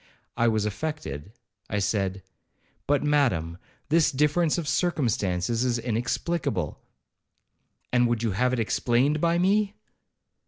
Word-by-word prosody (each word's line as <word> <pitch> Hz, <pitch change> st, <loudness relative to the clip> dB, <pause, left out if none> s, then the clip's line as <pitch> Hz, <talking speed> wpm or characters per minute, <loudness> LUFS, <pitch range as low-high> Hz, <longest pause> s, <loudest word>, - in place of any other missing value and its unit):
I 120 Hz, -, +2 dB
was 110 Hz, -2 st, +1 dB
affected—I 105 Hz, -, -6 dB
said, 100 Hz, -2 st, -1 dB, 0.6 s
'But, 145 Hz, 0 st, +2 dB
Madam, 115 Hz, -, +1 dB, 0.3 s
this 160 Hz, 0 st, +4 dB
difference 150 Hz, +4 st, +2 dB
of 165 Hz, -4 st, -3 dB
circumstances 115 Hz, -, 0 dB
is 125 Hz, -2 st, +1 dB
inexplicable.' 115 Hz, -, -2 dB, 1.1 s
'And 125 Hz, -1 st, +4 dB
would 120 Hz, -1 st, -1 dB
you 115 Hz, -, +1 dB
have 125 Hz, +7 st, +1 dB
it 130 Hz, -, -1 dB
explained 125 Hz, +6 st, +1 dB
by 170 Hz, 0 st, +2 dB
me? 200 Hz, +3 st, +2 dB
120 Hz, 115 wpm, -26 LUFS, 105-150 Hz, 1.1 s, this